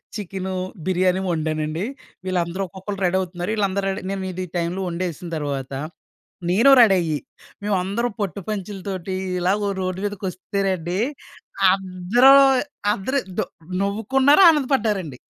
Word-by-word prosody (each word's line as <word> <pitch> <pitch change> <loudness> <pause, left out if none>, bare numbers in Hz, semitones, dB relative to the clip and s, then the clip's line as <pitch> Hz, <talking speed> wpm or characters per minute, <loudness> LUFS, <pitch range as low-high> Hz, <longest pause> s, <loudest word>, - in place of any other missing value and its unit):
Chicken, 190 -2 -4 0.3
biryani 185 0 +2
వండానండి. 155 +1 -2 0.4
వీళ్ళందరూ 180 0 -1
ఒక్కొక్కళ్ళు 195 +2 -7
రెడీవుతున్నారు. 180 0 -1
వీళ్ళందరూ 200 -2 0
రెడీ 190 - -4
నేనిది 185 -2 -4
టైమ్‌లో 175 +3 -2
వండేసిన 175 -1 -4
తర్వాత 140 -3 -4 0.8
నేను 230 +10 +5
రెడయ్యి. 180 -9 +4 0.5
మేమందరం 205 +4 -1
పట్టు 200 -1 -2
పంచలతోటి 195 -2 -4 0.2
ఇలాగ 200 +3 +1
రోడ్డు 185 0 -2
మీదకొస్తేనండి 190 -2 -2 0.7
అందరూ 195 +7 +4 0.6
అందరూ 260 +7 -1 0.2
దొ - - +2 0.4
నవ్వుకున్నారు 260 - +3
ఆనందపడ్డారండి. 220 - 0
190 Hz, 100 wpm, -22 LUFS, 180-205 Hz, 0.8 s, నేను